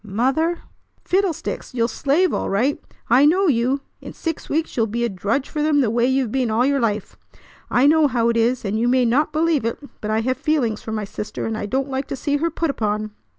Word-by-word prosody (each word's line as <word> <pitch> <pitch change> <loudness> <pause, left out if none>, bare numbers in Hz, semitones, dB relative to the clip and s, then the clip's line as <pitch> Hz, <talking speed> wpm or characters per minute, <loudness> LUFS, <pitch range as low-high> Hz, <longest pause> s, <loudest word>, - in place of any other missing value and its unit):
Mother! 270 - 0 0.4
fiddlesticks! 365 -8 -1
You'll 230 -1 +2
slave 300 +9 +1
all - - -1
right. 240 +9 0 0.3
I 250 +4 +5
know 375 +6 +3
you. 260 0 +1 0.2
In - - -9
six 330 -2 -5
weeks 320 +2 -1
you'll 225 -2 +1
be 235 +3 -1
a - - -1
drudge 205 +8 -1
for 300 - -3
them 300 -1 +3
the 230 -5 +1
way 235 +1 +2
you've 260 -3 +1
been 255 -2 0
all 225 +3 +2
your 280 0 +2
life! 215 -4 -2 0.5
I 245 - +3
know 310 +1 +5
how 235 -4 +1
it 235 - +1
is, 235 +1 +1
and 205 +2 -1
you 235 - +1
may 250 0 +3
not 255 +6 +2
believe 315 -3 +1
it; 230 +1 -2 0.2
but 210 - -4
I 220 +1 +1
have 255 +3 -1
feelings 255 -9 0
for 220 - -7
my 215 -1 -2
sister, 210 +2 -5
and 225 - -2
I 205 - -4
don't 265 +5 -1
like 265 +1 -2
to - - -4
see 285 +3 -1
her 330 +3 0
put 330 -1 -1
upon." 215 -3 -2
255 Hz, 235 wpm, -21 LUFS, 225-290 Hz, 0.5 s, I